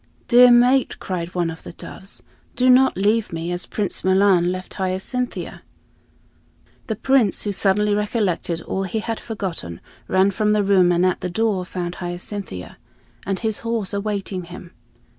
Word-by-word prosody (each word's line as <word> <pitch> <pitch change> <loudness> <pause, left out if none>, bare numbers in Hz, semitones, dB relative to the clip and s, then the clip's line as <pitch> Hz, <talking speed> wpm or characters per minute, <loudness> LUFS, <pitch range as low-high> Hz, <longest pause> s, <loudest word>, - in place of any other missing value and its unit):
"Dear 245 0 +8
mate," 245 +2 +4
cried 180 -1 -5
one 170 -2 0
of 160 - -10
the - - -10
doves, 190 +3 -7 0.3
"do 255 +1 +4
not 260 -2 +5
leave 210 +3 +1
me 165 +1 -4
as 175 0 -3
Prince 205 -3 -3
Milan 190 -2 +4
left 185 0 -6
Hyacinthia." 190 +7 -3 1.3
The 220 - -2
Prince, 240 -3 +2
who 205 - -1
suddenly 205 +1 +2
recollected 205 -5 -1
all 190 - -3
he 195 +3 -3
had 225 +1 -3
forgotten, 175 - -5 0.3
ran 190 +1 +3
from 210 +1 +1
the 210 -1 +2
room 190 -3 +4
and 175 +1 +2
at 185 - 0
the 180 - -2
door 200 -1 0
found 180 -1 -5
Hyacinthia 175 - -6 0.5
and 195 -1 0
his 220 -1 -2
horse 230 -4 -2
awaiting 200 -3 -3
him. 175 0 -11
195 Hz, 160 wpm, -21 LUFS, 180-220 Hz, 1.3 s, Dear